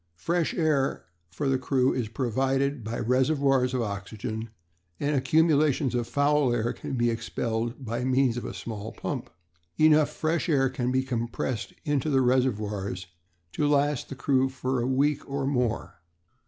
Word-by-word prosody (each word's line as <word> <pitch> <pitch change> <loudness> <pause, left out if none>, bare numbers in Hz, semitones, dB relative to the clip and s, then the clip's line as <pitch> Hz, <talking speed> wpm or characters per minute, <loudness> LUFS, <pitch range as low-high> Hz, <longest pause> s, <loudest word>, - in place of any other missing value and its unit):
"Fresh 170 - 0
air 150 -5 +1 0.2
for 145 - -3
the 135 -1 +2
crew 130 0 +2
is 120 -4 -1
provided 135 +3 0
by 110 +2 -4
reservoirs 130 +1 +2
of 125 - +1
oxygen, 110 +2 -5 0.5
and 145 +1 0
accumulations 145 -1 +3
of 120 -1 -1
foul 145 +1 +2
air 120 0 0
can - - -5
be 120 -1 +2
expelled 115 +2 -3
by 120 +2 -2
means 130 -1 +2
of 120 - -4
a - - -4
small 110 -1 -6
pump. - - -5 0.5
Enough 155 -1 +5
fresh 160 +3 -1
air 135 -4 +3
can 125 -1 -2
be 130 0 +2
compressed 120 -2 -3
into 145 -1 0
the 135 -2 +3
reservoirs 105 -7 0 0.5
to 150 - 0
last 145 -1 +1
the 135 - -6
crew 135 0 +2
for 130 -1 -2
a 120 - -1
week 140 +2 +2
or 140 0 -2
more." 125 -9 -1
130 Hz, 155 wpm, -27 LUFS, 120-140 Hz, 0.5 s, Enough